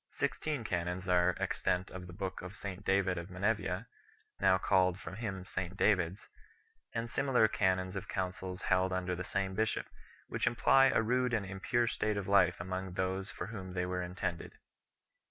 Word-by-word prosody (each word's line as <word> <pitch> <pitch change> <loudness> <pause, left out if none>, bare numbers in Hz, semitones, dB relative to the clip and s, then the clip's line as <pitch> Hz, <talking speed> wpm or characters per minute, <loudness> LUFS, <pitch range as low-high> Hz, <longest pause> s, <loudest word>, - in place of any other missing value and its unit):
Sixteen 150 -6 -1
canons 90 -2 -2
are 90 0 +4
extant 90 +1 0
of 90 -1 -7
the 90 - -10
book 95 +1 -4
of 95 +3 -8
St 100 -1 -6
David 95 -2 +2
of 85 +2 -8
Menevia 100 +5 -1 0.5
3 - - +2
now 95 - +6
called 95 -1 +3
from 95 - -7
him 95 -5 -4
St 95 0 -4
David 90 -5 +3
s 100 - -16 0.7
and 115 0 -1
similar 125 -2 +3
canons 95 -2 +1
of 95 - -4
councils 95 0 -3
held 95 0 +2
tinder 90 -1 -1
the 90 - -4
same 95 +1 -1
bishop, 110 +3 0 0.4
which - - -1
imply 135 0 +5
a 125 - +3
rude 125 +1 +2
and 105 -3 -1
impure 95 +5 0
state 110 -2 0
of 100 - -3
life 95 -3 +4
among 95 +1 -4
those 95 +2 -1
for - - -5
whom 95 -3 -6
the} 90 -1 0
were 90 0 -2
intended. 90 -1 -4
95 Hz, 180 wpm, -33 LUFS, 90-100 Hz, 0.7 s, now